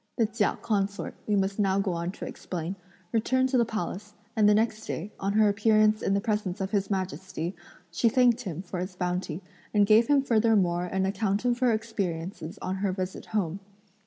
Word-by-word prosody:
The 230 - +4
Chia 215 -1 0
consort, 200 -2 -1
we 210 - +2
must 195 +1 0
now 195 -2 +2
go 195 -2 0
on 170 +1 -2
to - - -7
explain, 175 +1 -5 0.4
returned 260 +3 +2
to 260 - +2
the 235 - +4
Palace, 210 -1 -5 0.2
and 210 -2 +5
the 210 - +5
next 220 0 0
day, 200 +6 -4
on 195 +1 -1
her 215 0 +5
appearance 215 +1 +3
in 195 - +1
the - - +2
presence 210 -4 -1
of 190 0 -3
His 200 -2 0
Majesty, 185 -2 -3 0.4
she 200 +7 +2
thanked 245 0 +4
him 180 -6 -5
for 180 -1 -5
his 185 +1 -4
bounty 180 -1 -2 0.3
and 205 -1 +6
gave 220 +3 +5
him 285 -2 +4
furthermore 210 -8 +2
an 190 +1 -1
account 200 +2 0
of 240 -1 +2
her 250 -2 +3
experiences 190 -5 -3
on 190 +1 -2
her 195 0 0
visit 185 0 -5
home. 195 -4 -1
200 Hz, 195 wpm, -27 LUFS, 185-220 Hz, 0.4 s, and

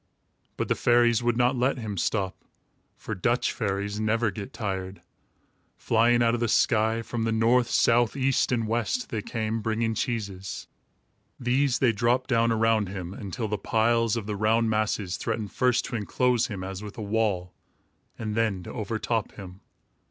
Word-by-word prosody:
But - - -1
the - - +2
fairies 120 -1 +3
would 120 -1 +1
not 125 +2 +3
let 125 +2 +1
him 110 -4 -4
stop, 95 +1 -1 0.6
for - - -5
Dutch 120 +7 +1
fairies 100 -1 -2
never 110 +1 +1
get 100 -2 -7
tired. 95 -2 -4 0.7
Flying 120 +1 +3
out 115 0 +3
of 120 - 0
the 120 - +1
sky 110 +1 +2
from 120 0 -4
the 115 - 0
north, 115 +2 +3
south, 120 +1 +3
east 135 -1 +1
and 115 -3 0
west 120 - -1
they 110 -3 -2
came, 110 0 -3
bringing 110 +1 0
cheeses. 100 -5 -4 0.7
These 125 +1 +2
they 125 -3 +3
dropped 120 +5 0
down 115 -1 +3
around 110 -3 +2
him, 95 -2 -6
until 105 +2 -4
the 105 -1 -2
piles 115 +1 +2
of 110 - -4
the 105 0 -3
round 110 +2 +2
masses 105 -3 -1
threatened 110 -3 -3
first 125 -2 +2
to - - -5
enclose 120 +2 +1
him 100 -5 -6
as 95 +1 -6
with 105 -1 -9
a 110 - -4
wall, 100 -4 -1 0.6
and 110 -1 -4
then 105 -5 0
to - - -8
overtop 110 0 -2
him. 95 -1 -11
110 Hz, 170 wpm, -26 LUFS, 105-120 Hz, 0.7 s, fairies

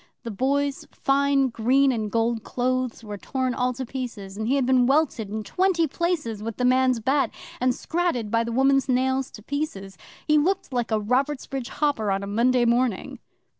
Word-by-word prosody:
The 230 - -5
Boy's 275 +6 -1
fine 275 -1 +2
green 260 +4 +3
and 220 -4 -2
gold 230 -1 0
clothes 255 -1 -2
were 205 -2 -7
torn 260 +2 -2
all 250 0 0
to 260 +1 -5
pieces, 235 -7 -6
and 220 +1 -3
he 265 - +2
had 270 -2 +1
been 250 -1 +3
welted 270 -7 +1
in 215 +1 -4
twenty 360 - +1
places 305 - -2
with 225 0 -5
the 250 - 0
man's 255 -1 +3
bat, 270 +5 +1 0.3
and 250 0 +1
scratted 320 -11 -1
by 230 0 +2
the 235 - -4
woman's 270 +2 +2
nails 260 +1 +1
to 215 - -13
pieces. 200 -10 -4 0.3
He 300 0 +5
looked 345 -2 -1
like 240 -2 -1
a 220 -1 +1
Robertsbridge 260 +3 -1
hopper 280 -8 0
on 195 0 0
a - - -3
Monday 240 +4 +2
morning. 235 -3 0
255 Hz, 185 wpm, -24 LUFS, 230-275 Hz, 0.3 s, He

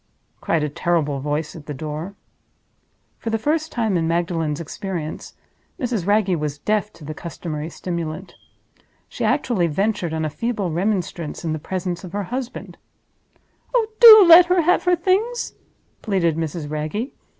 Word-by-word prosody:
cried 160 -2 0
a - - 0
terrible 150 -2 0
voice 150 +4 -3
at 155 -3 -11
the 150 - -5
door. 155 +7 -6 1.0
For 230 - -4
the 225 - +1
first 310 +7 -1
time 220 -5 0
in 165 -1 0
Magdalen's 165 -3 -1
experience, 170 -1 -6 0.4
Mrs. 235 - -2
Wragge 205 -3 +3
was 150 -1 -3
deaf 210 +6 -1
to 150 - -13
the 155 - -5
customary 160 -1 -6
stimulant. 170 +1 -5 0.7
She - - -6
actually 185 -9 +1
ventured 190 +1 -1
on 160 0 -2
a - - -1
feeble 210 -1 -2
remonstrance 175 -3 -2
in 160 - -1
the 155 - -3
presence 180 +2 -4
of 180 -1 -9
her 205 0 -2
husband. 255 -1 -6 1.0
"Oh, 470 -3 +4
do 435 -4 +11
let 340 +1 +9
her 360 0 +3
have 355 +3 +2
her 360 0 +4
Things!" 395 +8 0 0.5
pleaded 185 -7 +1
Mrs. 160 -1 -4
Wragge. 155 - -3
175 Hz, 155 wpm, -21 LUFS, 155-225 Hz, 1.0 s, do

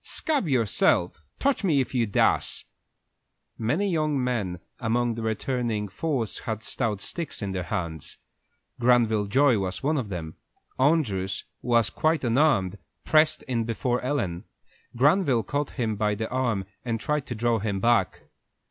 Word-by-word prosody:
"Scab 290 - -1
yourself! 110 - +2 0.2
Touch 275 -5 +1
me 160 -7 +3
if 130 -1 -2
you 120 -3 +1
dasse!" 100 - +2 0.9
Many 150 - 0
young 155 -6 0
men 105 -8 -2 0.2
among 120 0 +1
the 115 - -5
returning 110 -1 -1
force 120 - -2
had 110 -2 -4
stout 110 -5 -1
sticks 165 -5 -3
in 100 - -2
their 95 -1 -2
hands. 85 -3 -4 0.6
Granville 115 -4 +3
Joy 130 +1 +4
was 95 +3 -3
one 150 +2 +1
of 115 -5 -4
them. 80 -4 -6 0.4
Andrew, 130 - +2 0.3
who - - -11
was 115 -3 +3
quite 155 -1 +1
unarmed, 115 - +2 0.3
pressed 155 0 +3
in 120 -3 -1
before 120 +2 -1
Ellen. 110 -9 -2 0.5
Granville 140 - +3
caught 145 +7 -2
him 115 -4 0
by 105 0 +1
the 110 +2 -3
arm 120 -7 0 0.2
and 115 -2 -2
tried 150 +2 -1
to 120 - -4
draw 115 +1 +1
him 100 -1 -2
back. 115 -3 +2
120 Hz, 150 wpm, -26 LUFS, 105-140 Hz, 0.9 s, Joy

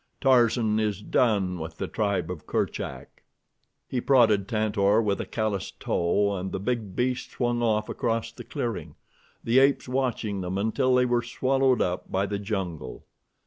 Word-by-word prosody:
Tarzan 120 -4 +3
is 105 -3 0
done 100 -8 +1
with 80 +1 -7
the - - -3
tribe 100 -5 -1
of 85 -4 -8
Kerchak." - - -3 0.7
He 125 - -2
prodded 110 -8 +4
Tantor 105 -2 +2
with 105 -3 0
a - - -6
calloused 105 -5 -3
toe 100 +4 +1
and 95 +1 -4
the - - -3
big 110 -2 -3
beast 125 0 -1
swung 120 -1 0
off 110 -2 +1
across 115 0 -2
the - - -10
clearing, 115 -4 -4 0.5
the 120 +3 +4
apes 135 0 +3
watching 120 -6 -1
them 90 +1 -3
until 125 +5 +1
they 125 0 +4
were 120 -1 +2
swallowed 130 +1 +1
up 90 0 -3
by 95 +1 +1
the 100 0 -3
jungle. 95 -7 -4
110 Hz, 160 wpm, -26 LUFS, 100-120 Hz, 0.7 s, prodded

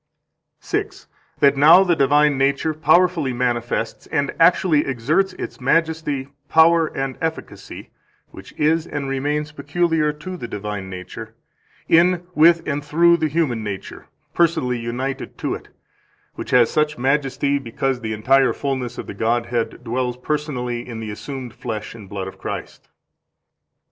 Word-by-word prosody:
143 - - -3 0.3
That 140 0 +5
now 165 +7 +8
the 175 -3 +2
divine 145 +1 +3
nature 140 +3 +1
powerfully 160 -3 +2
manifests 120 -2 -2
and 140 0 -1
actually 165 -2 +4
exerts 145 +9 0
its - - -7
majesty, 155 -1 0 0.2
power, 160 0 +5
and 135 -3 -4
efficacy 160 0 -6 0.4
(which - - -12
is 160 +2 +1
and 145 -2 -4
remains 145 +3 -2
peculiar 150 +1 0
to 165 +5 -8
the 120 - -6
divine 105 -2 -5
nature) 95 +5 -9 0.5
in, 175 +1 +4
with, 165 +1 +4
and 145 -1 -2
through 170 +3 +4
the 160 - 0
human 145 -8 -1
nature 100 -2 -7 0.3
personally 130 -8 +1
united 125 +4 -4
to - - -2
it; - - -8 0.7
which - - -7
has 125 -2 +4
such 150 -1 0
majesty 135 +1 0
because 130 +1 -2
the 110 -1 -3
entire 130 +5 +3
fullness 130 -3 -3
of - - -5
the - - -7
Godhead 115 +3 -1
dwells 125 +1 -2
personally 125 -4 -3
in 115 -2 -6
the 110 -1 -5
assumed 130 +2 -7
flesh 110 -3 -6
and 105 -4 -12
blood 95 -1 -5
of 95 - -10
Christ. - - -7
135 Hz, 145 wpm, -21 LUFS, 120-155 Hz, 0.7 s, now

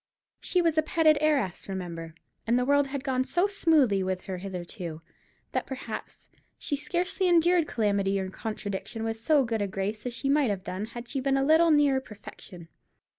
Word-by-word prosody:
She 360 -1 +1
was 325 -2 +2
a - - +5
petted 310 -1 +3
heiress, 275 -13 0
remember, 170 -4 -6 0.3
and 235 +2 +3
the 250 - +1
world 285 +1 +3
had 270 -1 -5
gone 260 -1 0
so 350 +7 +1
smoothly 310 - +3
with 185 0 -2
her 185 -2 -6
hitherto, 175 -3 -6 0.5
that - - -2
perhaps 265 0 -7 0.3
she 290 - -2
scarcely 355 +5 -1
endured 345 -1 +4
calamity 200 -3 0
or 190 - -3
contradiction 215 +1 -5
with 225 0 -2
so 280 +5 +3
good 225 -3 -2
a 200 - 0
grace 200 +4 -3
as 240 - -4
she 275 - -3
might 280 -2 +3
have 195 -2 -2
done 190 +3 -4
had 240 +2 -9
she 275 - -3
been 270 +1 +1
a 270 - +1
little 320 +3 +5
nearer 290 -3 +4
perfection. 200 -6 -12
245 Hz, 185 wpm, -27 LUFS, 195-300 Hz, 0.5 s, a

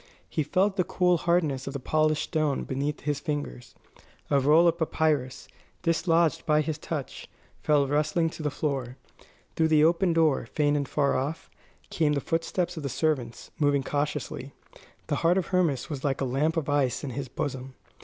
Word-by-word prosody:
He - - -2
felt 190 +6 +1
the 185 - +3
cool 180 0 +2
hardness 160 -6 0
of 140 - -4
the 140 - -4
polished 155 +2 +1
stone 155 -3 -1
beneath 140 +3 -3
his 145 -1 -1
fingers. 145 - -5 0.6
A 140 - +4
roll 155 +5 +5
of 170 0 +1
papyrus, 155 -5 0 0.4
dislodged 165 -1 +2
by 155 -1 +3
his 155 0 -3
touch, 155 -4 -6 0.3
fell 145 -2 +3
rustling 155 +4 +1
to - - -9
the 150 - 0
floor. 135 -4 -3 0.6
Through 160 - +3
the 155 -1 +4
open 170 +3 +3
door, 160 -7 +2
faint 145 +3 +1
and 140 -2 -1
far 140 -2 +1
off, 145 +5 -3 0.4
came 150 -3 +1
the 145 - +1
footsteps 170 +4 -2
of - - -4
the 140 - -3
servants, 130 -5 -2
moving 145 -2 +2
cautiously. 145 -2 -3 0.5
The - - -1
heart 170 +2 +3
of 190 - -1
Hermas 170 -9 +1
was 145 -4 -6
like 140 -3 0
a 135 - 0
lump 145 +6 0
of 155 - -1
ice 145 -3 +1
in 140 - -4
his 135 +2 -4
bosom. 130 -1 -5
150 Hz, 180 wpm, -27 LUFS, 140-165 Hz, 0.6 s, roll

